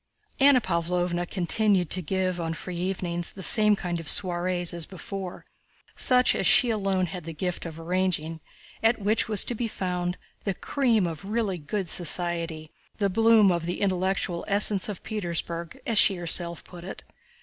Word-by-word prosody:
Anna 275 -1 +6
Pávlovna 175 -2 -2
continued 190 -1 +1
to 185 - +1
give 185 +1 -2
on 165 0 -3
free 180 +1 -7
evenings 175 -1 -2
the 190 - -8
same 210 0 +5
kind 175 -3 -4
of 165 - -3
soirees 175 -1 +3
as 170 -2 -4
before—such 195 +6 -2
as 190 - 0
she 240 +6 +5
alone 195 -3 0
had 180 0 -7
the 165 0 -8
gift 180 +1 -3
of 165 0 -9
arranging—at 180 +5 -2
which 210 +2 0
was 210 -2 +5
to - - -3
be 235 0 -3
found 180 -3 -3 0.3
"the 195 -2 -2
cream 235 -7 0
of 165 -1 -5
really 205 -3 -2
good 185 +6 -4
society, 170 -2 +1 0.3
the 200 -2 0
bloom 225 -1 +5
of 170 -1 -2
the 175 - -3
intellectual 185 -2 -1
essence 205 -1 +2
of 205 - -7
Petersburg," 170 -4 -4
as 230 -3 +2
she 195 - +5
herself 170 -1 -1
put 175 -1 -12
it. 190 - -8
185 Hz, 160 wpm, -26 LUFS, 170-205 Hz, 0.3 s, Anna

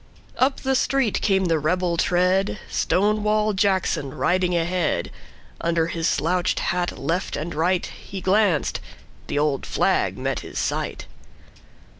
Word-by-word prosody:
Up 265 +1 +2
the 265 - 0
street 265 -3 +1
came 190 -2 +2
the 165 -2 +2
rebel 175 +3 0
tread, 185 +4 +2
Stonewall 210 +2 +1
Jackson 190 -8 0
riding 180 +1 +1
ahead. 175 0 -1 0.5
Under 170 -1 +1
his 165 -1 -1
slouched 175 +3 +1
hat 175 0 -1
left 175 +3 -2
and 155 +4 -4
rightHe 180 +3 -2
glanced: 190 -5 +2 0.5
the - - -2
old 145 -2 +1
flag - - +1
met - - -2
his - - -9
sight. - - -2
180 Hz, 125 wpm, -23 LUFS, 165-195 Hz, 0.5 s, Up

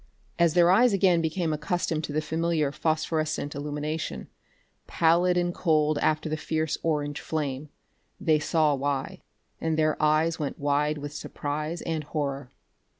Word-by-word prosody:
As 170 -1 +3
their 175 0 +6
eyes 230 +4 +5
again 185 -3 +3
became 160 0 -1
accustomed 160 0 -1
to - - -7
the 155 +1 0
familiar 160 -2 0
phosphorescent 155 -1 -1
illumination, 150 +2 -4 0.6
pallid 175 +2 +3
and 175 0 +1
cold 155 -4 +2
after 155 +1 +1
the 155 - -1
fierce 160 0 -1
orange 145 -3 -1
flame, 145 -2 -3 0.5
they 160 -6 +3
saw 155 -1 +2
why 140 -1 -2 0.4
and 160 -1 -1
their 155 0 +1
eyes 155 +2 +2
went 145 -3 -3
wide 145 +1 +1
with 145 0 -6
surprise 150 +2 -4
and 160 -2 -2
horror. 140 -3 -3
155 Hz, 145 wpm, -27 LUFS, 150-165 Hz, 0.6 s, their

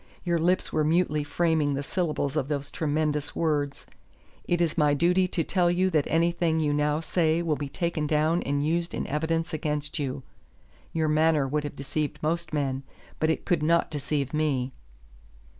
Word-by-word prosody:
Your 170 -2 +1
lips 180 +3 +1
were 155 - +2
mutely 155 -1 +2
framing 150 -1 +1
the 140 - -2
syllables 150 -4 -1
of 145 -4 0
those 145 -1 -3
tremendous 150 -1 -1
words: 145 -4 -1 0.6
'It 175 - +1
is 170 -2 +1
my 150 -3 +3
duty 180 +4 +3
to 175 -2 -1
tell 180 -1 +2
you 185 +2 +2
that 155 -4 +2
anything 170 0 +1
you 150 -2 +1
now 150 +1 +1
say 165 0 +1
will 160 -3 +1
be 145 -1 -5
taken 170 -1 -1
down 155 +3 +2
and 145 +1 -1
used 170 +2 0
in - - -2
evidence 165 +3 -1
against 150 0 -2
you.' 135 -1 -3 0.7
Your 160 -1 0
manner 155 -2 +3
would 150 +2 -1
have 145 - -5
deceived 145 +2 -3
most 165 +1 -1
men, 135 -3 -1 0.4
but 155 - +2
it 160 - -1
could 175 -5 +1
not 170 +2 +2
deceive 145 -1 -2
me." 135 -4 0
155 Hz, 175 wpm, -27 LUFS, 145-170 Hz, 0.7 s, my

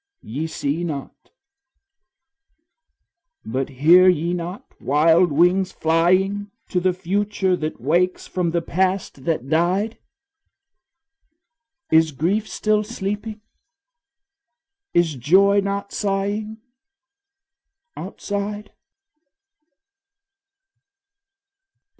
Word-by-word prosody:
Ye 145 +9 -4
see 160 +1 -3
not, 145 -5 -6 2.2
but 130 +4 -2
hear 165 +8 +6
ye 170 0 +1
not 180 +2 -5 0.2
wild 160 +5 +3
wings 180 +5 +3
flying 185 +5 +1 0.2
To 180 - 0
the 185 +1 +2
future 190 +1 -1
that 155 -1 -4
wakes 175 +7 0
from 180 -2 -2
the 170 0 -1
past 185 -6 -1
that 155 -6 -1
died? 180 +8 0 1.9
Is 160 -1 +4
grief 190 +10 -1
still 215 0 +1
sleeping, 210 0 -5 1.5
is 175 -2 +3
joy 190 +10 +4
not 200 0 -3
sighing 205 +2 -2 1.4
Outside? 205 +2 -5
180 Hz, 80 wpm, -21 LUFS, 160-200 Hz, 2.2 s, hear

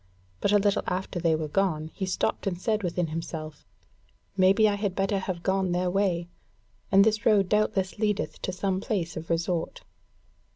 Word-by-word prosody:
But 200 - +1
a 205 - +6
little 205 0 +2
after 185 0 -2
they 165 -2 +2
were 155 -1 -3
gone, 160 -2 0
he 190 - -3
stopped 185 - -1
and 175 -2 -2
said 215 +2 0
within 180 -1 -1
himself: 155 -1 -6 0.7
"Maybe 195 +3 +5
I 205 - +2
had 200 -2 -2
better 195 0 0
have 185 -2 -4
gone 190 -2 +1
their 180 0 0
way, 180 -3 0 0.6
and 195 0 +7
this 215 0 +1
road 205 -4 +4
doubtless 210 -2 0
leadeth 210 -2 -1
to - - -2
some 190 0 -1
place 180 -6 -2
of 160 0 -7
resort." 165 0 -1
190 Hz, 175 wpm, -27 LUFS, 170-200 Hz, 0.7 s, and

